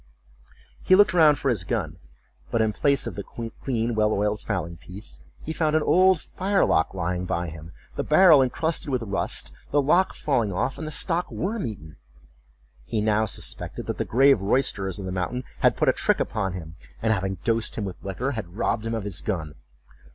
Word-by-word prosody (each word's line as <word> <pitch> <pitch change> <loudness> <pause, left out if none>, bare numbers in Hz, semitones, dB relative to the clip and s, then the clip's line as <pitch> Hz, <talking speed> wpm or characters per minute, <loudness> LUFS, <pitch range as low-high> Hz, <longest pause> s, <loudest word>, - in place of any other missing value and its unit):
He 185 - +5
looked 205 -3 +5
round 155 -4 +6
for 140 0 -1
his 110 -7 0
gun, 90 -6 -3 0.5
but 115 - 0
in 110 -1 +2
place 140 +4 +1
of - - -4
the 100 - -5
clean 115 +1 -3
well 110 -1 +2
oiled 105 0 0
fowling 85 -5 -3
piece, 95 +6 -9 0.2
he 160 - -4
found 155 -1 +1
an 155 - +3
old 185 -1 +4
firelock 185 - +1
lying 90 0 -2
by 85 -1 -2
him, 80 +1 -10 0.2
the - - -2
barrel 155 -2 +6
incrusted 150 +4 0
with 130 -3 -1
rust, 100 -3 -3 0.2
the 145 - +2
lock 170 +7 +3
falling 120 -8 0
off, 90 +8 -2
and 160 - -5
the - - -5
stock 170 +3 +1
worm 205 - -2
eaten. 80 -9 -9 0.9
He 110 - -2
now 110 +1 +2
suspected - - -5
that - - -4
the - - +2
grave 135 -2 +4
roysterers 100 -3 +1
of 100 - -6
the 95 - -4
mountain 95 +8 -2 0.2
had - - +3
put - - +1
a - - +5
trick - - +1
upon 95 -4 -2
him, 85 -2 -8 0.2
and 110 -1 +2
having 95 -1 -2
dosed 115 -1 0
him 105 - -3
with 95 -3 -8
liquor, 115 +8 -2
had 105 -7 -6
robbed 115 -1 -1
him 115 - -2
of 110 - -3
his 100 -3 -4
gun. 80 -8 -3
110 Hz, 195 wpm, -25 LUFS, 95-140 Hz, 0.9 s, round